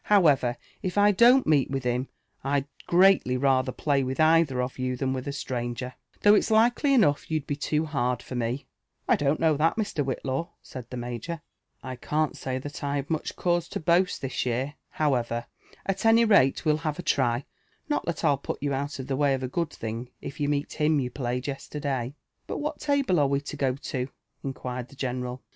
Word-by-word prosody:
However, 145 -11 +4 0.2
if 185 +1 -3
I 205 0 +6
don'l 240 +6 +6
meet 145 -4 +3
with 135 -1 -2
him, 125 +2 0 0.4
Vd 140 0 +1 0.2
greatly 180 -8 +5
ratlher 130 -1 +1
play 140 -2 +2
^i(h 130 +2 -3
either 155 -4 +4
of 125 +1 -3
yon 130 0 -1
than 130 +1 -1
with 130 +1 -4
ft 140 - -3
stranger; 125 -1 -4 0.3
though 205 - +8
it's 210 - +3
likely 240 +6 +4
enough 150 - +3
you'd 155 -3 -1
be 145 - -2
too 150 +2 0
hard 125 -5 -1
for - - -8
me." 125 +2 -2 0.4
I - - +5
don'l 145 +1 +1
know 160 -2 +3
that, 160 +2 +2
Mr. 205 -9 -1
Whillaw," 135 +4 -2
said 125 -3 -9
the 125 - -6
major; 120 +7 -5 0.4
I 130 -1 -6
can't 155 +4 0
sUf 130 0 -4
(hat 145 +1 -7
I've 140 +1 -2
much 155 - -2
cause 175 -1 0
lo - - 0
boast 175 -1 +2
Ihis 130 - -1
year. 130 +4 -1 0.2
However, 120 -6 0 0.4
at 195 0 -2
any 225 +1 +6
ralejive'U 155 - +4
ha\en 160 +2 -3
try 125 -3 +1 0.2
— - - -40
not 295 - 0
that 170 -3 -1
Til 145 -4 +2
put 140 - -4
you 140 -1 0
out 140 +2 -3
of 130 - -5
the 135 - -1
way 140 0 +3
of 130 - -5
a - - -1
good 165 +5 -1
(hiog 115 +2 -5
if 140 - -8
you 145 -1 0
ttieet 145 0 -1
him 150 -1 +2
you 125 -2 -2
played 125 -1 -3
yesterday." 140 -2 -3 0.3
But - - -3
what 300 +1 -3
table 280 - +2
are 145 - +4
we 140 0 +1
lo 140 - -5
go 130 -2 0
to 130 -2 -3 0.2
?" - - -48
inquired 125 -2 -4
the - - -15
general. 125 -1 -4
140 Hz, 205 wpm, -27 LUFS, 130-160 Hz, 0.4 s, though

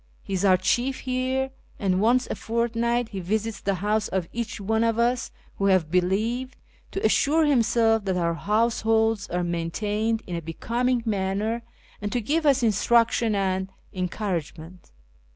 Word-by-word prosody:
He 195 - -6
is 190 0 0
our 185 -2 +5
chief 245 +8 0
here, 260 +1 -1 0.3
and 190 -1 +1
once 245 +3 +3
a - - -4
fortnight 235 +1 -1
he 200 -4 -5
visits 215 +4 -2
the 200 -1 0
house 210 +3 0
of 185 -3 -2
each 230 -2 -4
one 220 +3 +1
of 230 -1 +1
us 240 +1 +1 0.3
who 195 - +2
have 185 -5 +2
believed, 220 +8 0 0.3
to 390 - -3
assure 310 +3 +3
himself 230 -5 +3
that 190 -2 0
our 170 -1 +1
house 220 +6 +1
holds 225 -1 +2
are 180 0 -1
maintained 210 +6 -1
in 175 - -5
a 170 - -3
becoming 235 +9 -1
manner, 210 +2 -1 0.4
and 205 0 -3
to 245 - +1
give 305 +7 0
us 270 -3 +4
instruction 230 +1 +3
and 190 -1 0 0.2
encouragement. 180 -2 -4
220 Hz, 160 wpm, -25 LUFS, 190-235 Hz, 0.4 s, our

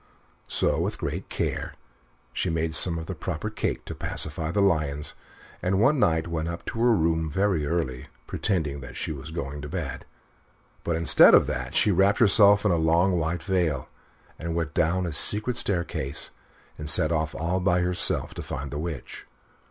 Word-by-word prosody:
So, - - 0
with - - -2
great - - -5
care, - - -3 0.6
she - - -2
made 80 -1 -1
some 85 0 +3
of 80 - -6
the - - -5
proper - - -5
cake - - -3
to - - -6
pacify 80 -1 -2
the 95 +5 -1
lions, 75 -6 0 0.5
and 95 +1 0
one 135 +6 +3
night 80 -5 +1
went 80 -1 -3
up 85 0 -6
to 115 - -5
her 120 +1 +4
room 80 -2 0
very 95 -3 0
early, 70 -6 -3 0.2
pretending 80 -9 -2
that 60 -2 -10
she - - -4
was 70 0 -7
going 75 -3 -6
to 75 - -7
bed; 80 -5 -5 0.8
but 85 - -1
instead 80 0 +7
of - - +5
that, 60 0 -5
she 105 - +3
wrapped 95 +2 +3
herself 105 -1 +5
in 100 - +3
a 85 - +2
long 85 +3 +2
white 80 +1 -2
veil, 85 -9 -1 0.5
and 85 0 -4
went 80 -2 -2
down 90 +3 +1
a 85 - -4
secret 105 - +4
staircase, 85 -8 -1 0.5
and 75 0 -2
set 80 -1 +4
off 80 -1 -1
all 85 +3 -1
by 90 -1 +1
herself 90 0 +1
to - - -7
find 70 0 -6
the 75 - -4
Witch. 80 -4 -7
85 Hz, 185 wpm, -25 LUFS, 80-95 Hz, 0.8 s, instead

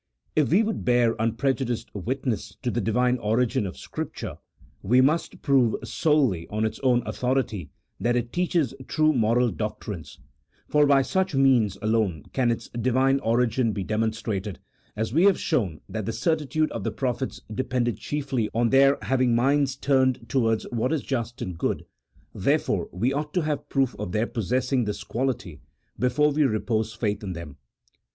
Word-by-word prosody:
If 150 -3 +3
we 190 +8 +4
would 220 0 -2
bear 120 -2 +3
unprejudiced 120 +2 -1
witness 120 +3 -3
to 125 - 0
the 120 - -1
Divine 125 +4 +1
origin 110 -1 +1
of 90 - -8
Scripture, - - -6 0.4
we 125 +6 +3
must 150 +6 +1
prove 130 -6 +3
solely 135 - +1
on 110 +1 -1
its 110 - -3
own 125 -2 +2
autho 125 +1 -1
rity 105 - -2 0.3
that 120 +5 +1
it 120 0 -2
teaches 175 -7 +1
true 155 0 +3
moral 120 0 +2
doctrines, 85 - -5 0.5
for 150 -1 +4
by 140 -1 +5
such 190 +2 0
means 125 -8 +3
alone 105 -8 +1
can 125 -3 +2
its 115 - -2
Divine 130 +3 +2
origin 115 -1 +1
be 100 - -3
demonstrated: 110 -2 -2 0.6
we 165 +6 +4
have 200 -2 +5
shown 100 - -1
that 110 -3 -4
the 115 - -1
certitude 155 0 0
of 115 - -4
the - - 0
prophets 130 -1 -3
depended 125 -1 -1
chiefly 135 -6 -2
on 115 0 +2
their 135 +1 +5
having 130 -3 +2
minds 135 +2 +2
turned 130 -3 +1
towards 115 -2 +1
what 120 +3 0
is 160 -4 0
just 120 -1 -3
and 90 -7 -6
good, - - -1 0.5
there - - +2
fore - - -2
we 115 +9 0
ought 150 +3 -3
to 180 - +3
have 150 -2 -3
proof 135 -3 +1
of 90 - -4
their 110 +2 +1
possessing 125 +3 0
this 105 - -4
quality 120 - -3 0.4
before 135 +5 +3
we 150 +2 0
repose 110 -3 +1
faith 105 -3 -2
in 95 -3 -4
them. 85 -4 -8
125 Hz, 165 wpm, -25 LUFS, 110-135 Hz, 0.6 s, by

